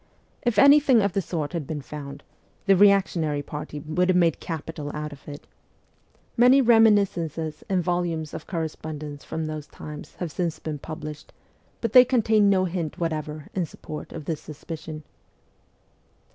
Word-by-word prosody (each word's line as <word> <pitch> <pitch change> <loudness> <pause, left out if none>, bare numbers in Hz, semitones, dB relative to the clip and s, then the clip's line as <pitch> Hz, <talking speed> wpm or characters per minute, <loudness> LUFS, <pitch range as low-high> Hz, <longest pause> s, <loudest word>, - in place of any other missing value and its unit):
If 240 -2 0
anything 280 -5 +6
of 200 -3 0
the 195 - +1
sort 160 -4 -4
had 165 -5 -3
been 150 -3 -4
found, 140 0 -8 0.4
the 195 -1 +5
reactionary 180 -7 +3
party 150 +1 -6
would 175 +5 0
have 185 - +4
made 170 -3 +3
capital 160 -2 -5
out 150 0 -4
of 140 - -16
it. 145 0 -9 0.9
Many 250 +3 +6
reminiscences 200 - +3
and 185 -2 +1
volumes 170 -3 -1
of - - -7
corre 165 -3 -1
spondence 150 -2 -8
from 160 0 -4
those 155 -1 -5
times 150 0 -10
have 175 -3 -5
since 170 0 -2
been 150 -2 -5
published, 155 0 -8 0.5
but 230 -2 -2
they 250 - +10
contain 220 -5 +3
no 190 -1 +3
hint 170 -4 -3
whatever 155 -2 -3
in 180 -3 -1
support 150 - -9
of 155 -3 -7
this 160 -1 -3
suspicion. 155 0 -8
165 Hz, 160 wpm, -25 LUFS, 150-195 Hz, 0.9 s, they